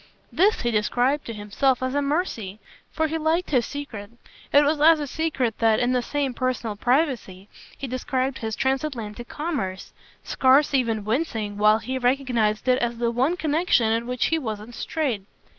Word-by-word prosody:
This 395 Hz, +6 st, +3 dB
he 240 Hz, -, 0 dB
described 245 Hz, +6 st, +1 dB
to 230 Hz, -, -5 dB
himself 225 Hz, +6 st, 0 dB
as 255 Hz, 0 st, -1 dB
a 285 Hz, -, +1 dB
mercy, 280 Hz, -, -2 dB, 0.3 s
for 320 Hz, -, 0 dB
he 320 Hz, +1 st, -2 dB
liked 320 Hz, +3 st, 0 dB
his 250 Hz, -5 st, +2 dB
secret. 235 Hz, -9 st, -7 dB, 0.4 s
It 285 Hz, -, +6 dB
was 295 Hz, 0 st, +1 dB
as 320 Hz, +1 st, +6 dB
a 295 Hz, -, -2 dB
secret 275 Hz, -6 st, -2 dB
that, 225 Hz, -1 st, +3 dB
in 245 Hz, 0 st, +1 dB
the 250 Hz, -1 st, +2 dB
same 275 Hz, +1 st, -2 dB
personal 245 Hz, -4 st, -2 dB
privacy, 240 Hz, -, 0 dB, 0.3 s
he -, -, -5 dB
described 260 Hz, +1 st, -2 dB
his 220 Hz, -1 st, -3 dB
transatlantic 255 Hz, -5 st, -2 dB
commerce, 280 Hz, -, -4 dB, 0.3 s
scarce 270 Hz, +3 st, +3 dB
even 230 Hz, -6 st, 0 dB
wincing 220 Hz, -4 st, -2 dB
while 215 Hz, +1 st, +5 dB
he 255 Hz, +4 st, -4 dB
recognised 245 Hz, -4 st, 0 dB
it 255 Hz, 0 st, +4 dB
as 240 Hz, -1 st, -1 dB
the 235 Hz, 0 st, 0 dB
one 265 Hz, +9 st, +1 dB
connexion 305 Hz, -8 st, +2 dB
in 230 Hz, +1 st, -1 dB
which 250 Hz, -1 st, 0 dB
he 325 Hz, -, +1 dB
wasn't 220 Hz, -3 st, -6 dB
straight. 265 Hz, -6 st, -2 dB
255 Hz, 175 wpm, -24 LUFS, 225-290 Hz, 0.4 s, It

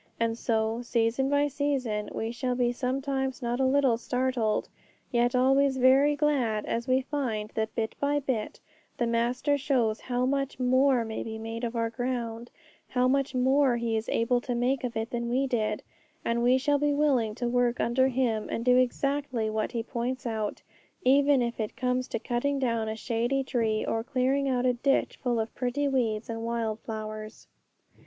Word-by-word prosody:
And 230 Hz, 0 st, +1 dB
so, 225 Hz, 0 st, 0 dB
season 240 Hz, +2 st, +1 dB
by 285 Hz, +1 st, +3 dB
season, 265 Hz, -7 st, -1 dB
we 225 Hz, +1 st, -3 dB
shall 250 Hz, +1 st, -2 dB
be 245 Hz, -1 st, +2 dB
sometimes 265 Hz, +1 st, -2 dB
not 240 Hz, +1 st, -1 dB
a 265 Hz, -, +3 dB
little 265 Hz, -4 st, +3 dB
startled, 250 Hz, -3 st, 0 dB, 0.4 s
yet 240 Hz, +1 st, +2 dB
always 270 Hz, +1 st, +3 dB
very 270 Hz, +3 st, +5 dB
glad, 265 Hz, -8 st, +1 dB
as 235 Hz, +2 st, -2 dB
we 260 Hz, +1 st, +3 dB
find 245 Hz, -7 st, -3 dB
that 220 Hz, 0 st, -2 dB
bit 220 Hz, -1 st, -1 dB
by 290 Hz, +1 st, +1 dB
bit 255 Hz, -6 st, -3 dB, 0.4 s
the 240 Hz, -, +1 dB
Master 245 Hz, +5 st, +1 dB
shows 250 Hz, -6 st, +1 dB
how 250 Hz, 0 st, -1 dB
much 275 Hz, 0 st, -1 dB
more 255 Hz, -1 st, +3 dB
may 220 Hz, 0 st, -4 dB
be 220 Hz, 0 st, -5 dB
made 225 Hz, +1 st, -6 dB
of 235 Hz, 0 st, -2 dB
our 230 Hz, 0 st, 0 dB
ground, 235 Hz, -1 st, -3 dB, 0.4 s
how 250 Hz, 0 st, +2 dB
much 275 Hz, 0 st, +1 dB
more 260 Hz, 0 st, +3 dB
He 230 Hz, -1 st, -1 dB
is 220 Hz, 0 st, -2 dB
able 240 Hz, +2 st, +1 dB
to 245 Hz, 0 st, -3 dB
make 250 Hz, +3 st, 0 dB
of 240 Hz, -3 st, -3 dB
it 225 Hz, +2 st, -3 dB
than 235 Hz, -1 st, -2 dB
we 260 Hz, +3 st, +1 dB
did; 215 Hz, -5 st, -1 dB, 0.4 s
and 235 Hz, 0 st, +1 dB
we 250 Hz, +2 st, +4 dB
shall 285 Hz, +2 st, +1 dB
be 290 Hz, 0 st, +1 dB
willing 260 Hz, -8 st, +2 dB
to 245 Hz, +1 st, -2 dB
work 245 Hz, 0 st, +1 dB
under 260 Hz, +3 st, +2 dB
Him 240 Hz, -4 st, 0 dB
and 230 Hz, -, -3 dB
do 250 Hz, 0 st, +5 dB
exactly 255 Hz, -2 st, 0 dB
what 215 Hz, 0 st, -1 dB
He 230 Hz, -1 st, -1 dB
points 245 Hz, +2 st, -3 dB
out, 220 Hz, -3 st, -3 dB, 0.4 s
even 280 Hz, 0 st, +4 dB
if 235 Hz, 0 st, -3 dB
it 215 Hz, -1 st, -3 dB
comes 250 Hz, -1 st, 0 dB
to -, -, -2 dB
cutting 245 Hz, +5 st, -1 dB
down 230 Hz, -4 st, 0 dB
a 220 Hz, -, -3 dB
shady 240 Hz, +4 st, -1 dB
tree, 225 Hz, -4 st, 0 dB
or 225 Hz, 0 st, -1 dB
clearing 270 Hz, +2 st, +1 dB
out 250 Hz, -1 st, +1 dB
a 250 Hz, -, +3 dB
ditch 275 Hz, +3 st, 0 dB
full 240 Hz, -3 st, 0 dB
of 220 Hz, 0 st, -3 dB
pretty 260 Hz, +3 st, -1 dB
weeds 230 Hz, -5 st, 0 dB
and 225 Hz, -1 st, -4 dB
wild 230 Hz, -2 st, -2 dB
flowers. 215 Hz, -1 st, -7 dB
245 Hz, 185 wpm, -28 LUFS, 230-265 Hz, 0.4 s, very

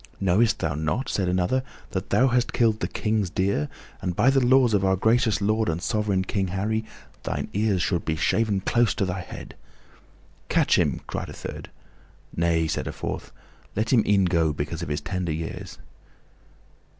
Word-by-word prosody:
"Knowest 100 Hz, +5 st, +3 dB
thou 80 Hz, -, -1 dB
not," 80 Hz, -, -2 dB
said 95 Hz, -3 st, 0 dB
another, 90 Hz, +8 st, +1 dB, 0.3 s
"that 95 Hz, +1 st, -3 dB
thou 130 Hz, -, +4 dB
hast 125 Hz, 0 st, +1 dB
killed 110 Hz, -3 st, +2 dB
the -, -, -1 dB
King's 105 Hz, -3 st, -1 dB
deer, 95 Hz, -6 st, 0 dB, 0.3 s
and, 90 Hz, -2 st, -2 dB
by 120 Hz, +7 st, +4 dB
the 135 Hz, -1 st, +3 dB
laws 125 Hz, -2 st, +5 dB
of 100 Hz, -2 st, +2 dB
our 95 Hz, 0 st, +3 dB
gracious 110 Hz, +1 st, +2 dB
lord 110 Hz, +1 st, +1 dB
and 80 Hz, 0 st, -1 dB
sovereign 100 Hz, +2 st, 0 dB
King 95 Hz, 0 st, -1 dB
Harry, 105 Hz, +4 st, -1 dB, 0.4 s
thine -, -, -3 dB
ears 100 Hz, -3 st, +1 dB
should 85 Hz, -2 st, 0 dB
be 80 Hz, -, -1 dB
shaven 105 Hz, +4 st, +1 dB
close 120 Hz, +2 st, +2 dB
to 100 Hz, -, 0 dB
thy 90 Hz, 0 st, -3 dB
head?" -, -, -9 dB, 1.0 s
"Catch -, -, +3 dB
him!" -, -, +1 dB
cried -, -, -4 dB
a -, -, -8 dB
third. -, -, -7 dB, 0.7 s
"Nay," 85 Hz, -1 st, +2 dB
said -, -, -2 dB
a -, -, -2 dB
fourth, -, -, -5 dB, 0.4 s
"let 110 Hz, +4 st, 0 dB
him 115 Hz, -4 st, +5 dB
e'en 100 Hz, -2 st, +4 dB
go 85 Hz, -3 st, +2 dB
because 75 Hz, +3 st, -4 dB
of 85 Hz, -, -4 dB
his 75 Hz, -, -2 dB
tender 90 Hz, -4 st, -2 dB
years." 80 Hz, +1 st, -6 dB
95 Hz, 180 wpm, -25 LUFS, 85-110 Hz, 1.0 s, laws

